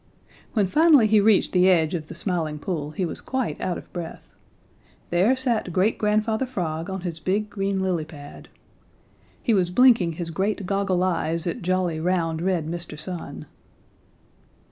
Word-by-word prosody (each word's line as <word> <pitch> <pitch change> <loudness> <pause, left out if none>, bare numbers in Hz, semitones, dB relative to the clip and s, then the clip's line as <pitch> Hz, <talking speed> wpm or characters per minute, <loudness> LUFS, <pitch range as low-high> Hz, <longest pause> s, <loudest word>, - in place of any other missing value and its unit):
When 210 -4 +2
finally 295 - +5
he 215 0 +4
reached 210 -1 +3
the 180 0 +4
edge 165 -3 +3
of 160 -3 -3
the - - -9
Smiling 165 -4 -2
Pool 150 -2 -3
he 180 +5 -2
was 165 - -5
quite 260 -2 -3
out 180 - -1
of - - -13
breath. 170 -2 -8 0.8
There 190 +9 +3
sat 240 -8 -1
Great 190 +6 +1
Grandfather 215 +3 +1
Frog 170 -8 -3
on 190 -1 -4
his 170 -3 -5
big, 205 +5 -1
green 195 -1 -1
lily 175 -4 -1
pad. 145 -3 -12 0.9
He 230 - +2
was 185 -4 +2
blinking 225 -5 +4
his 165 +1 -5
great 195 +3 -1
goggle 195 -1 0
eyes 165 -2 0
at 170 - -3
jolly, 180 -2 0
round, 165 -2 0
red 180 -3 0
Mr. 170 -2 -6
Sun. 155 -3 -5
185 Hz, 165 wpm, -24 LUFS, 165-205 Hz, 0.9 s, finally